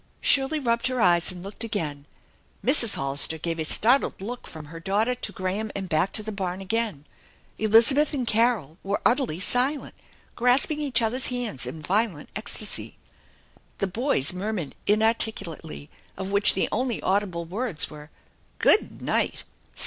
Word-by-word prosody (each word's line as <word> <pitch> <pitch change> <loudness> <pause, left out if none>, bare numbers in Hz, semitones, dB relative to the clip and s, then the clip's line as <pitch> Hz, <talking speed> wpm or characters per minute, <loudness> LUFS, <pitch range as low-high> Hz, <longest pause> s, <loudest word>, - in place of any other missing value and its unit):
Shirley 275 +3 +3
rubbed 235 -4 0
her 255 -1 -2
eyes, 175 -3 +3
and 180 -1 -10
looked 205 +4 -5
again. 150 -10 -4 0.6
Mrs. 250 -6 +5
Hollister 140 +3 -1
gave 165 +1 -4
a 160 - -1
startled 245 - +3
look 235 +6 -7
from 155 -2 -10
her 165 +3 -10
daughter 205 +7 0
to 250 - -4
Graham 195 +3 -3
and 195 -1 -4
back 165 +3 0
to 215 - +1
the 215 - -5
barn 190 -2 -4
again. 200 -6 -1 0.5
Elizabeth 230 +7 +4
and 270 -5 -2
Carol 225 - 0
were 200 +1 -2
utterly 240 - +1
silent, 255 +8 +1 0.4
grasping 250 +5 +3
each 265 -6 +1
other's 250 +4 0
hands 240 - -4
in 155 +5 -8
violent 190 -3 0
ecstasy. 210 0 -4 0.8
The - - -1
boys 195 - 0
murmured 185 -5 -4
inarticulately, 210 - 0 0.3
of 190 +1 -5
which 200 0 +6
the 190 - 0
only 245 0 -1
audible 185 -3 -1
words 195 0 -2
were: 150 0 -11 0.3
" - - -37
Good - - +2
night - - +2
205 Hz, 155 wpm, -25 LUFS, 170-240 Hz, 0.8 s, which